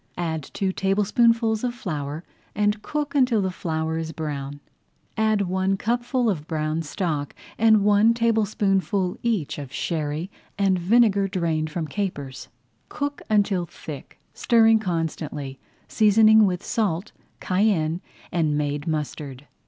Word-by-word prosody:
Add 160 -4 -3
two 195 -1 0
tablespoonfuls 220 +4 +2
of 245 -1 -1
flour 150 -7 -4 0.3
and 210 +1 +1
cook 295 +2 -3
until 255 -5 +3
the 190 -2 0
flour 160 -2 -2
is 160 -1 -4
brown. 145 -3 -5 0.6
Add 220 -1 +2
one 190 +1 0
cupful 240 +3 0
of 165 -8 -1
brown 155 0 -1
stock 150 -2 -3 0.2
and 220 -2 +5
one 210 +3 +4
tablespoonful 205 -4 +1
each 215 -12 -1
of 140 -3 -8
sherry 155 +4 -3 0.3
and 195 -2 +2
vinegar 200 +1 +3
drained 165 -4 -1
from 160 0 -3
capers. 145 -7 -4 0.4
Cook 285 0 -4
until 200 -4 +2
thick, 150 -2 -10
stirring 225 -1 +4
constantly, 160 -7 -3 0.3
seasoning 220 0 +5
with 180 -2 -2
salt, 205 -4 -1 0.3
cayenne, 185 -4 +1 0.3
and 155 -4 +1
made 145 0 -2
mustard. 145 -3 -4
190 Hz, 125 wpm, -24 LUFS, 155-215 Hz, 0.6 s, and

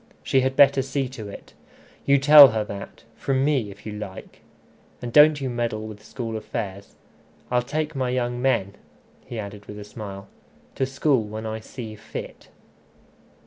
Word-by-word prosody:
She 135 - +2
had 130 +1 0
better 140 -1 +6
see 135 0 -2
to 110 -5 -8
it. - - -11 0.5
You 140 0 +6
tell 145 +1 +10
her 110 -3 -1
that 100 -1 -9
from 135 +2 0
me, 135 -8 +1
if 100 +1 -13
you 110 - -5
like. 105 -3 -9 0.6
And 120 -1 -6
don't 150 0 +7
you 135 - -3
meddle 120 -3 -2
with 105 -1 -10
school 115 -1 -5
affairs. 100 -3 -6 0.6
I'll 125 0 +3
take 150 +5 -3
my 130 -2 -1
young 120 -1 -1
men," 100 -7 +1 0.5
he 120 - -6
added 100 -1 -7
with 105 - -8
a 105 - -7
smile, 100 -2 -9 0.5
"to 130 - -1
school 135 -1 +1
when 110 +1 -6
I 110 0 -4
see 110 0 -8
fit." 110 +1 -9
120 Hz, 170 wpm, -24 LUFS, 105-135 Hz, 0.6 s, tell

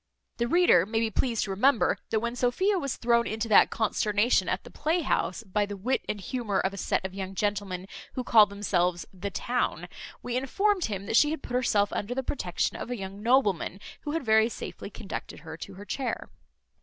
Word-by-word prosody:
The 235 - 0
reader 245 - +5
may 225 +1 0
be 225 -1 0
pleased 230 0 0
to 195 - -4
remember, 235 +5 +3
that 220 - +1
when 235 +1 -2
Sophia 365 +12 +1
was 275 -5 -2
thrown 235 0 +2
into 220 +1 -2
that 210 - +7
consternation 210 -2 +1
at 185 - -1
the - - -12
playhouse, 300 - 0
by 205 0 0
the 205 0 -6
wit 250 +8 -1
and 210 - -2
humour 210 +1 -2
of 190 - 0
a - - -7
set 190 - -1
of 190 - -4
young 195 0 -5
gentlemen 200 -3 -2 0.3
who 255 - -3
call 220 -3 +6
themselves 180 -4 0
the 190 +2 -4
town, 245 +5 -2 0.4
we 245 - -3
informed 375 +9 +1
him, 200 -2 -4
that 225 - +2
she 295 - +5
had 315 -1 -4
put - - -7
herself 215 -5 +2
under 230 +5 -3
the 265 - -1
protection 180 -10 -2
of - - -6
a 245 - -3
young 195 0 -7
nobleman, 210 -6 +2 0.2
who 295 - -4
had 325 -4 -2
very 220 +1 +4
safely 210 - -7
conducted 200 -7 -7
her 160 0 -8
to 190 +3 -9
her 200 +2 -10
chair. 255 +1 -3
220 Hz, 205 wpm, -28 LUFS, 195-250 Hz, 0.4 s, that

